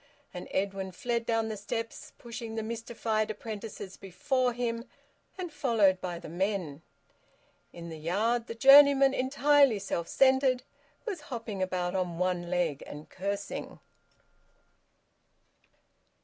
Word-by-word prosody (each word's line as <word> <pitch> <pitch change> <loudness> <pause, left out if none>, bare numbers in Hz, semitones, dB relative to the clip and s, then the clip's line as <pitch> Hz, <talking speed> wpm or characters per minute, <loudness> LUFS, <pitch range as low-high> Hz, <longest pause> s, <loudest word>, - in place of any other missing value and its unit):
And - - -7
Edwin 195 -1 -2
fled 235 +4 -2
down 225 -1 +1
the 215 - -3
steps, 225 +3 -5
pushing 230 -1 -7
the 220 - -2
mystified 225 -1 -2
apprentices 215 -2 -7
before 250 +7 0
him, 235 -1 -3 0.5
and 355 -4 -5
followed 215 -10 +3
by 175 -2 -4
the - - -9
men. 175 -3 -2 0.9
In 170 0 -9
the 160 -1 -8
yard 220 +9 0
the 230 - -6
journeyman, 275 +2 +7
entirely 275 -1 +4
self 180 -4 -3
centred, 265 -1 +3 0.4
was 395 -9 -4
hopping 230 -6 -5
about 180 -1 -1
on 180 -3 -2
one 180 -1 -1
leg 175 -5 0
and 150 +1 -10
cursing. 200 +1 -4
220 Hz, 120 wpm, -29 LUFS, 185-245 Hz, 0.9 s, journeyman